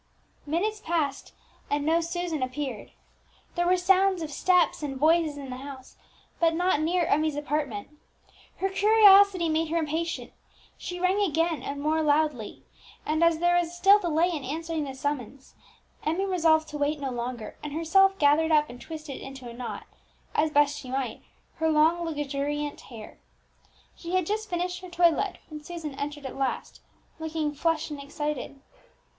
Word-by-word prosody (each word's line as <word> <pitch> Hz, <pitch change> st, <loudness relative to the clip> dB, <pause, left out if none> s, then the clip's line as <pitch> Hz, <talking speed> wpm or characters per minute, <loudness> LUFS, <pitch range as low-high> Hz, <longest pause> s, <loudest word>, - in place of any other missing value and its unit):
Minutes 410 Hz, +8 st, -1 dB
passed, 315 Hz, -7 st, -2 dB, 0.4 s
and 290 Hz, 0 st, 0 dB
no 330 Hz, +2 st, +3 dB
Susan 335 Hz, -2 st, -3 dB
appeared. 255 Hz, -3 st, -4 dB, 0.6 s
There 350 Hz, 0 st, 0 dB
were 365 Hz, +1 st, +4 dB
sounds 375 Hz, 0 st, +3 dB
of 305 Hz, -, -6 dB
steps 360 Hz, +3 st, +2 dB
and 275 Hz, -3 st, -4 dB
voices 310 Hz, +1 st, +3 dB
in 275 Hz, -2 st, -7 dB
the 250 Hz, -, -5 dB
house, 265 Hz, -1 st, -10 dB, 0.4 s
but 330 Hz, -1 st, +3 dB
not 355 Hz, -3 st, +2 dB
near 340 Hz, +2 st, +1 dB
Emmie's 310 Hz, 0 st, +1 dB
apartment. 290 Hz, -7 st, -3 dB, 0.7 s
Her 385 Hz, -, 0 dB
curiosity 400 Hz, -3 st, +6 dB
made 320 Hz, +1 st, +1 dB
her 335 Hz, -, 0 dB
impatient; 330 Hz, +1 st, -2 dB, 0.4 s
she 355 Hz, 0 st, -6 dB
rang 370 Hz, +3 st, +2 dB
again, 330 Hz, -3 st, +1 dB
and 280 Hz, 0 st, -5 dB
more 310 Hz, +2 st, +1 dB
loudly; 295 Hz, -6 st, 0 dB, 0.4 s
and 315 Hz, +2 st, +1 dB
as 335 Hz, -1 st, +4 dB
there 350 Hz, +1 st, +2 dB
was 350 Hz, 0 st, 0 dB
still 395 Hz, +3 st, +6 dB
delay 345 Hz, -1 st, +1 dB
in 305 Hz, -5 st, -4 dB
answering 320 Hz, +3 st, -3 dB
the 270 Hz, -1 st, -7 dB
summons, 270 Hz, -1 st, -4 dB, 0.5 s
Emmie 335 Hz, +6 st, 0 dB
resolved 325 Hz, -4 st, +3 dB
to 295 Hz, -, -6 dB
wait 290 Hz, +1 st, 0 dB
no 275 Hz, -2 st, -3 dB
longer, 240 Hz, -2 st, -5 dB
and 295 Hz, -, -6 dB
herself 385 Hz, +5 st, +3 dB
gathered 310 Hz, +2 st, +3 dB
up 300 Hz, -3 st, +3 dB
and 245 Hz, -, -12 dB
twisted 310 Hz, -3 st, -8 dB
into 270 Hz, -2 st, -9 dB
a 235 Hz, -, -8 dB
knot, 240 Hz, 0 st, -6 dB, 0.5 s
as 315 Hz, -, +2 dB
best 290 Hz, -1 st, +2 dB
she 255 Hz, -, -10 dB
might, 260 Hz, -3 st, -3 dB, 0.4 s
her 320 Hz, 0 st, +1 dB
long, 320 Hz, +3 st, +3 dB
luxuriant 295 Hz, -1 st, -3 dB
hair. 225 Hz, -4 st, -11 dB, 0.8 s
She 345 Hz, +2 st, -4 dB
had 370 Hz, -2 st, +2 dB
just 430 Hz, +3 st, -2 dB
finished 360 Hz, +1 st, -2 dB
her 365 Hz, -, -9 dB
toilette 350 Hz, +2 st, +2 dB
when 300 Hz, -1 st, -8 dB
Susan 325 Hz, -3 st, -6 dB
entered 290 Hz, +1 st, -5 dB
at 265 Hz, -, -6 dB
last, 270 Hz, -1 st, -3 dB, 0.4 s
looking 320 Hz, -2 st, -2 dB
flushed 325 Hz, +1 st, -1 dB
and 290 Hz, -1 st, -6 dB
excited. 290 Hz, -1 st, -4 dB
315 Hz, 165 wpm, -27 LUFS, 285-345 Hz, 0.8 s, curiosity